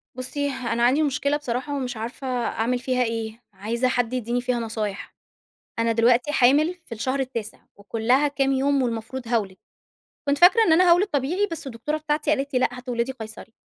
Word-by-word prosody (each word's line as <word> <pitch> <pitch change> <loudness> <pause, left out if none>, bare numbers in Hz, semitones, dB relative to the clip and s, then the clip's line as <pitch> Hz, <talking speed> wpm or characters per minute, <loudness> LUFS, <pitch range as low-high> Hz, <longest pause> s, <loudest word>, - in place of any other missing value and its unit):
بُصّي، 285 +3 -2
أنا 240 -3 -2
عندي 270 +6 +4
مشكلة 280 +1 0
بصراحة 275 +1 -3
ومش 255 -3 -3
عارفة 240 +4 -6
أعمل 245 -1 -1
فيها 255 0 0
إيه، 225 0 -4
عايزة 225 +6 -1
حد 245 -1 0
يدّيني 245 0 -1
فيها 250 -1 -1
نصايح. 220 -3 -4 0.6
أنا 230 0 +2
دلوقتي 235 +4 +3
حامل 295 +6 +4
في - - -25
الشهر 260 +5 -2
التاسع، 240 -5 -4 0.2
وكُلّها 225 +7 +1
كام 275 -1 0
يوم 275 +1 +2
والمفروض 235 +1 -3
هاولد. 210 -5 -1 0.7
كنت 280 0 +2
فاكرة 375 +6 +7
إن 325 - +4
أنا 355 +2 +5
هاولد 355 +4 +5
طبيعي 330 +6 0
بس 330 -3 -6
الدكتورة 265 +4 -3
بتاعتي 300 -1 -1
قالت 280 -2 -1
لي: - - +4
لأ - - +3
هتولدي 250 0 -3
قَيصَري." 225 -2 -10
255 Hz, 175 wpm, -24 LUFS, 230-285 Hz, 0.7 s, فاكرة